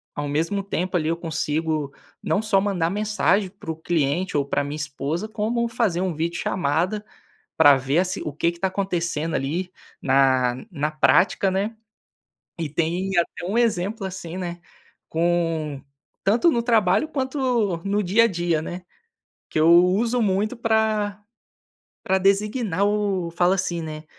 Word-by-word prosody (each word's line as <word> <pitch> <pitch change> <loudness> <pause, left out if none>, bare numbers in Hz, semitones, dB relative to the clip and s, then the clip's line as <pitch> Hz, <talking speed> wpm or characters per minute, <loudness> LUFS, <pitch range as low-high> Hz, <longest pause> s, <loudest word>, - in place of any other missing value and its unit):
ao 145 0 -3
mesmo 165 +8 -1
tempo 185 -2 -1
ali 155 -2 -1
eu 165 - +1
consigo 155 -3 -2 0.3
não 205 - +1
só 210 -3 +2
mandar 190 -4 0
mensagem 210 -1 +1
para 195 -4 -12
o - - -5
cliente 160 +2 -1
ou 145 - +3
para 140 - -1
a - - -2
minha 145 +1 -5
esposa, 150 +6 -3
como 225 +2 -1
fazer 225 -7 0
um 185 -2 -1
vídeo 170 +2 -2
chamada, 180 +6 -1 0.5
pra 145 -3 +8
ver 135 +3 -1
assi 185 0 -1
o 150 - -4
que 165 +4 0
que 170 - -13
está 190 - 0
acontecendo 175 -4 -2
ali, 170 +7 -2 0.3
na 130 -2 +3 0.2
na 150 -4 -2
prática, 180 +5 +3
né. 200 +4 -1 0.9
E, 160 - -2
tem 170 +5 -1
até 175 0 -1
um 200 +5 -2
exemplo 215 -3 0
assim, 180 -2 -7
né, 175 -2 -5 0.5
com 165 -4 -1 0.4
tanto 230 - +4
no 235 -6 0
trabalho 225 +3 +2
quanto 260 - 0
no 200 +1 0
dia 205 +5 +4
a - - +6
dia, 170 -4 0
né, 175 +3 -6 0.7
que 155 - 0
eu 160 +2 +5
uso 195 +8 +4
muito 210 +2 0
pra 220 -2 0 0.8
pra 190 -3 +1
designar 200 0 +1
o 200 -4 0
fala 175 +2 +2
assim, 180 -2 -2
né. 155 -1 -7
180 Hz, 160 wpm, -23 LUFS, 160-205 Hz, 0.9 s, pra